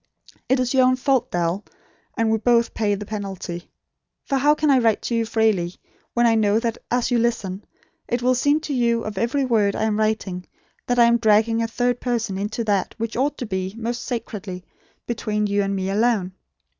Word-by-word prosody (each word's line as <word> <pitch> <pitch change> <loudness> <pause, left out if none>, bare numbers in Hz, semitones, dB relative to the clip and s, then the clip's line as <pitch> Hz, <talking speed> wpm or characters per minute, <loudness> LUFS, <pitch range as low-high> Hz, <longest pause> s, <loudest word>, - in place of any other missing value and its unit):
It 260 0 +3
is 255 0 0
your 260 -1 +5
own 255 - +3
fault, 255 -1 +1
Dal; 175 +3 -1 0.5
and 225 -1 +2
we 220 - +2
both 235 +1 +2
pay 210 -2 0
the 205 +1 -7
penalty. 195 -4 -6 0.6
For 275 - 0
how 295 +3 +4
can 305 -1 +2
I 265 - +5
write 225 -3 +2
to 235 - -1
you 230 -1 0
freely 215 -6 +1 0.4
when 240 0 +3
I 230 - +5
know, 215 -1 +3
that 230 -1 -2
as 245 0 0
you 240 - +3
listen, 210 -5 -1 0.4
it 240 0 -1
will 255 +1 +4
seem 285 +5 +2
to 300 - -4
you 235 -2 +1
of 210 -3 -4
every 260 +5 +1
word 215 -5 +2
I - - -1
am 215 -1 0
writing, 210 -4 -1 0.4
that 245 - +1
I 240 - +7
am 235 0 +4
dragging 225 +1 +3
a 230 - 0
third 245 +1 0
person 230 -6 -2
into 210 +3 -2
that 200 -4 0
which 230 0 -3
ought 280 +3 0
to 250 - -4
be, 190 -1 -3
most 235 +1 -3
sacredly, 200 -6 -5 0.4
between 215 -3 -1
you 205 0 +1
and 195 0 -1
me 190 0 -2
alone. 210 -3 +1
225 Hz, 205 wpm, -22 LUFS, 205-245 Hz, 0.6 s, I